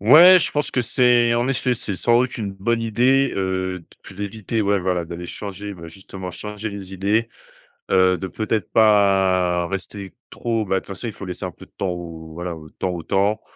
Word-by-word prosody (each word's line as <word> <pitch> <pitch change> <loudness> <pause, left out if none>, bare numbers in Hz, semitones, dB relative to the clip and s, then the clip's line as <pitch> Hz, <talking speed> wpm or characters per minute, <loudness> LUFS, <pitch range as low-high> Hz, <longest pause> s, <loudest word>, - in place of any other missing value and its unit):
Ouais, 165 - +9
je - - 0
pense 150 0 -1
que 125 - +1
c’est, 120 0 +3
en 120 +1 +1
effet, 130 -2 +1
c’est 105 -3 -4
sans 120 +5 +3
doute 125 0 -1
une 105 -4 -4
bonne 115 +4 -1
idée, 125 +5 +2
heu, 95 -1 -1
de - - -23 0.2
p - - -12
d’éviter. 105 +3 -3
Ouais, 100 -2 +2
voilà 90 -1 -1
d’aller 85 +1 -7
changer, 100 +1 -6
bah 85 -2 -10
justement, 95 +1 -9
changer 105 +3 -6
les 95 -2 -8
idées. 105 +5 0 0.6
Heu, 95 -1 +4
de 95 - -4
peut-être 110 0 -2
pas 95 -5 +3
rester 95 0 -6 0.2
trop 115 -2 -2
bah, 95 - 0
de - - +2
toute - - -21
façon, 100 +4 -6
il 110 - -5
faut 100 - -8
laisser 90 -1 -6
un - - -3
peu - - -14
de - - -30
temps 95 - -1
au 85 -2 -7
voilà, 85 0 -4
au 75 -1 -12
temps 95 - -3
au 85 -2 -5
temps, 100 +5 +1
100 Hz, 215 wpm, -22 LUFS, 90-115 Hz, 0.6 s, Ouais